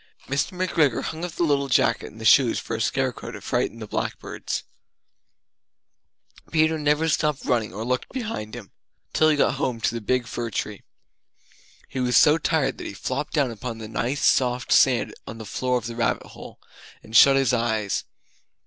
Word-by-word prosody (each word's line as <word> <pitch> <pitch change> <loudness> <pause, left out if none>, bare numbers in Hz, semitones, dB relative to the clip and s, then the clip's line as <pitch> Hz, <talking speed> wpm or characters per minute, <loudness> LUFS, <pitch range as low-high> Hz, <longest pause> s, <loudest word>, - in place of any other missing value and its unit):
Mr. 140 +6 -1
McGregor 160 -9 +1
hung 160 +1 -5
up 175 -2 -4
the - - -1
little 140 -3 +1
jacket 125 - +2
and 110 - -15
the 110 - -6
shoes 120 +1 +5
for - - -4
a - - -3
scare - - 0
crow - - -9
to - - -8
frighten - - -1
the 110 - -7
blackbirds. - - -4 1.9
Peter 160 0 +2
never 150 +2 +2
stopped 150 -2 0
running 115 -6 0
or 105 +4 -5
looked 125 +1 -1
behind 220 - -5
him 110 -5 -10 0.4
Till 155 - +4
he 150 - +2
got 140 - +3
home 125 -6 -1
to 115 - +1
the 115 - -4
big 125 +3 0
fir 120 +1 -4
tree. 105 -2 -4 1.1
He 130 - -5
was 125 -1 +3
so 150 +2 +6
tired 155 -3 0
that - - -5
he - - -6
flopped 130 +7 -3
down 140 -6 +1
upon 115 +1 -6
the 110 -1 -7
nice 125 +5 -1
soft 125 -1 +2
sand 125 -3 +4
on 115 - -7
the 110 - -8
floor 125 +4 -1
of 120 - -5
the 115 0 -5
rabbit 115 -2 0
hole, - - -12 0.4
and 110 - -9
shut 135 +4 +8
his 135 -3 +2
eyes. 110 -4 0
125 Hz, 190 wpm, -24 LUFS, 115-150 Hz, 1.9 s, shut